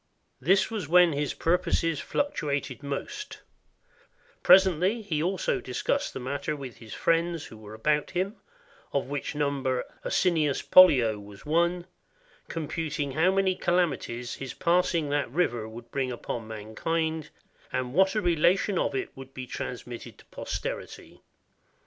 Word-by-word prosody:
This 190 Hz, -, +3 dB
was 205 Hz, -9 st, -3 dB
when 175 Hz, -1 st, +6 dB
his 145 Hz, 0 st, -1 dB
purposes 165 Hz, -2 st, +1 dB
fluctuated 145 Hz, -, -2 dB
most; 415 Hz, -, -5 dB, 1.0 s
presently 190 Hz, +4 st, +5 dB
he 160 Hz, -7 st, -1 dB
also 185 Hz, +3 st, 0 dB
discussed 125 Hz, -, -1 dB
the -, -, -3 dB
matter 140 Hz, +4 st, -3 dB
with 135 Hz, -4 st, -8 dB
his 115 Hz, -2 st, -10 dB
friends 165 Hz, -1 st, +1 dB
who 110 Hz, -, -11 dB
were 110 Hz, 0 st, -10 dB
about 150 Hz, +6 st, +1 dB
him 190 Hz, +4 st, -2 dB, 0.6 s
(of 140 Hz, -, +1 dB
which 145 Hz, +2 st, -4 dB
number 140 Hz, -3 st, 0 dB, 0.2 s
Asinius 160 Hz, -6 st, +1 dB
Pollio 125 Hz, -, +7 dB
was 100 Hz, +3 st, -13 dB
one), 170 Hz, +3 st, +1 dB, 0.6 s
computing 155 Hz, -2 st, -3 dB
how 160 Hz, +7 st, +3 dB
many 195 Hz, -1 st, +2 dB
calamities 145 Hz, -10 st, -1 dB
his 135 Hz, -2 st, -6 dB
pass 175 Hz, +1 st, +2 dB
ing 155 Hz, -3 st, 0 dB
that 145 Hz, -3 st, 0 dB
river 120 Hz, -7 st, 0 dB
would 115 Hz, +1 st, -11 dB
bring 130 Hz, -2 st, -1 dB
upon 120 Hz, -2 st, -5 dB
mankind, 155 Hz, +9 st, -2 dB, 0.4 s
and 130 Hz, -1 st, -2 dB
what 190 Hz, +5 st, +4 dB
a 215 Hz, -, +2 dB
re 175 Hz, -3 st, +2 dB
lation 185 Hz, +4 st, +3 dB
of 140 Hz, -, -2 dB
it 130 Hz, -, -3 dB
would 135 Hz, 0 st, -11 dB
be 130 Hz, -, -5 dB
transmitted 125 Hz, -1 st, -6 dB
to -, -, -18 dB
posterity. -, -, -6 dB
150 Hz, 145 wpm, -28 LUFS, 130-175 Hz, 1.0 s, Pollio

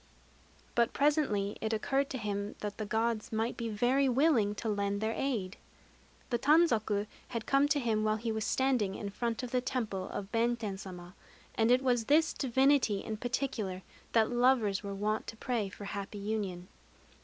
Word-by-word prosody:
But 235 Hz, 0 st, +2 dB
presently 275 Hz, -9 st, +1 dB
it 220 Hz, 0 st, -1 dB
occurred 270 Hz, +5 st, 0 dB
to 265 Hz, -, -3 dB
him 205 Hz, -2 st, -3 dB
that 210 Hz, 0 st, -5 dB
the 215 Hz, -, -3 dB
Gods 225 Hz, 0 st, -1 dB
might 225 Hz, +2 st, -1 dB
be 235 Hz, -1 st, -3 dB
very 250 Hz, +6 st, +2 dB
willing 250 Hz, -6 st, +3 dB
to 225 Hz, -, -4 dB
lend 200 Hz, -1 st, 0 dB
their 220 Hz, +1 st, -1 dB
aid. 220 Hz, -9 st, -2 dB, 0.7 s
The 240 Hz, -, +1 dB
tanzaku 230 Hz, -9 st, +3 dB, 0.2 s
had 230 Hz, -2 st, -4 dB
come 275 Hz, +1 st, +3 dB
to 290 Hz, 0 st, +2 dB
him 225 Hz, -4 st, 0 dB
while 215 Hz, 0 st, +2 dB
he 225 Hz, +1 st, -3 dB
was 220 Hz, 0 st, -2 dB
standing 250 Hz, -8 st, +1 dB
in 200 Hz, -1 st, -5 dB
front 235 Hz, +3 st, -2 dB
of 245 Hz, -, -5 dB
the 250 Hz, -, +1 dB
temple 215 Hz, -7 st, -3 dB
of 195 Hz, 0 st, -6 dB
Benten 230 Hz, -4 st, 0 dB
Sama; 180 Hz, -2 st, -9 dB, 0.4 s
and 225 Hz, -1 st, +2 dB
it 250 Hz, +2 st, +4 dB
was 250 Hz, -2 st, +3 dB
to 225 Hz, -, -12 dB
this 310 Hz, +2 st, +4 dB
divinity 265 Hz, -5 st, +2 dB
in 220 Hz, -1 st, -4 dB
particular 225 Hz, -6 st, -2 dB, 0.3 s
that 225 Hz, 0 st, +3 dB
lovers 240 Hz, -5 st, +3 dB
were 200 Hz, -1 st, -5 dB
wont 215 Hz, +2 st, -1 dB
to 225 Hz, -, -7 dB
pray 225 Hz, -4 st, -1 dB
for 205 Hz, +1 st, -9 dB
happy 200 Hz, 0 st, -5 dB
union. 200 Hz, -4 st, -3 dB
225 Hz, 180 wpm, -32 LUFS, 205-250 Hz, 0.7 s, it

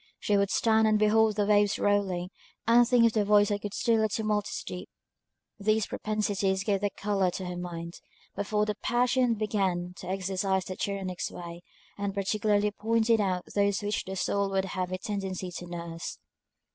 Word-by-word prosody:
She 205 Hz, -, +1 dB
would 200 Hz, -1 st, +2 dB
stand 220 Hz, 0 st, +3 dB
and 215 Hz, 0 st, +4 dB
behold 215 Hz, 0 st, +3 dB
the 205 Hz, -1 st, +1 dB
waves 205 Hz, 0 st, +3 dB
rolling, 190 Hz, -3 st, 0 dB, 0.4 s
and 235 Hz, +1 st, +6 dB
think 245 Hz, -1 st, +5 dB
of 230 Hz, -, +3 dB
the 215 Hz, -, +2 dB
voice 205 Hz, 0 st, +4 dB
that 205 Hz, -1 st, -1 dB
could 205 Hz, -1 st, -5 dB
still 230 Hz, -2 st, +2 dB
the 220 Hz, -, +2 dB
tumultuous 210 Hz, -1 st, -1 dB
deep. 180 Hz, -, -7 dB, 0.7 s
These 215 Hz, +1 st, +2 dB
propensities 200 Hz, -3 st, -1 dB
gave 200 Hz, -1 st, 0 dB
the 205 Hz, -, +1 dB
colour 195 Hz, -2 st, 0 dB
to 185 Hz, +1 st, -5 dB
her 180 Hz, 0 st, -4 dB
mind, 170 Hz, -1 st, -6 dB, 0.4 s
before 210 Hz, +1 st, 0 dB
the 210 Hz, -, -1 dB
passions 245 Hz, +2 st, +1 dB
began 190 Hz, -4 st, -1 dB
to 180 Hz, -, -9 dB
exercise 190 Hz, 0 st, -1 dB
their 185 Hz, -, -6 dB
tyrannic 190 Hz, -3 st, -3 dB
sway, 170 Hz, 0 st, -6 dB, 0.4 s
and 200 Hz, -1 st, -2 dB
particularly 205 Hz, +1 st, +1 dB
pointed 225 Hz, +1 st, +2 dB
out 185 Hz, -3 st, 0 dB
those 200 Hz, +1 st, +1 dB
which 205 Hz, 0 st, -1 dB
the 190 Hz, -, -5 dB
soil 200 Hz, +1 st, 0 dB
would 195 Hz, 0 st, 0 dB
have 185 Hz, -1 st, -3 dB
a 185 Hz, -, -1 dB
tendency 190 Hz, -2 st, -4 dB
to 175 Hz, -, -8 dB
nurse. 170 Hz, -1 st, -6 dB
200 Hz, 180 wpm, -28 LUFS, 190-215 Hz, 0.7 s, and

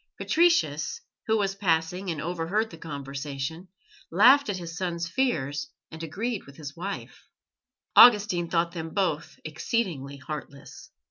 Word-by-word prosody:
Patricius, 160 Hz, -, +2 dB, 0.3 s
who 220 Hz, 0 st, +3 dB
was 195 Hz, -2 st, 0 dB
passing 180 Hz, -1 st, 0 dB
and 160 Hz, -3 st, -3 dB
overheard 175 Hz, +7 st, -1 dB
the 165 Hz, -, -10 dB
conversation, 140 Hz, +2 st, -5 dB, 0.4 s
laughed 255 Hz, -, +6 dB
at 200 Hz, -, -1 dB
his 170 Hz, -2 st, -7 dB
son's 170 Hz, -1 st, -2 dB
fears 150 Hz, -, -1 dB, 0.2 s
and 160 Hz, -, -9 dB
agreed 200 Hz, -, -3 dB
with 140 Hz, -, -14 dB
his 145 Hz, -2 st, -8 dB
wife. 195 Hz, +4 st, -7 dB, 0.7 s
Augustine 205 Hz, -7 st, +7 dB
thought 170 Hz, 0 st, +1 dB
them 165 Hz, -2 st, -6 dB
both 185 Hz, -7 st, -1 dB
exceedingly 155 Hz, -, -2 dB
heartless. 140 Hz, -1 st, -9 dB
170 Hz, 130 wpm, -27 LUFS, 150-200 Hz, 0.7 s, Augustine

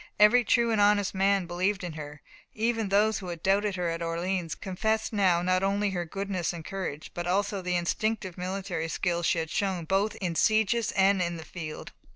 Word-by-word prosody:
Every 210 Hz, +4 st, +6 dB
true 235 Hz, +1 st, +2 dB
and 215 Hz, -2 st, +2 dB
honest 205 Hz, -1 st, +3 dB
man 195 Hz, 0 st, +2 dB
believed 185 Hz, +3 st, -1 dB
in 175 Hz, -3 st, -4 dB
her; 150 Hz, -1 st, -9 dB, 0.3 s
even 225 Hz, -1 st, 0 dB
those 210 Hz, +2 st, +3 dB
who 185 Hz, -, -8 dB
had 170 Hz, -2 st, -6 dB
doubted 200 Hz, +1 st, +2 dB
her 180 Hz, -1 st, -1 dB
at 165 Hz, 0 st, -3 dB
Orleans 170 Hz, 0 st, -2 dB
confessed 220 Hz, +4 st, -2 dB
now 185 Hz, -4 st, +3 dB
not 185 Hz, +1 st, +2 dB
only 200 Hz, +1 st, +1 dB
her 175 Hz, -2 st, -2 dB
goodness 190 Hz, -1 st, -3 dB
and 165 Hz, -2 st, -8 dB
courage, 180 Hz, -6 st, -5 dB
but 175 Hz, 0 st, -4 dB
also 200 Hz, +2 st, 0 dB
the 180 Hz, 0 st, -1 dB
instinctive 185 Hz, +2 st, -1 dB
military 180 Hz, -2 st, -3 dB
skill 170 Hz, +1 st, -1 dB
she 170 Hz, -, +1 dB
had 160 Hz, -1 st, -2 dB
shown 190 Hz, -4 st, -1 dB
both 195 Hz, +5 st, +1 dB
in 180 Hz, -4 st, -3 dB
sieges 220 Hz, +4 st, +2 dB
and 195 Hz, -1 st, +3 dB
in 170 Hz, -1 st, -1 dB
the 160 Hz, -, -9 dB
field. 155 Hz, -4 st, -7 dB
190 Hz, 195 wpm, -28 LUFS, 175-205 Hz, 0.3 s, Every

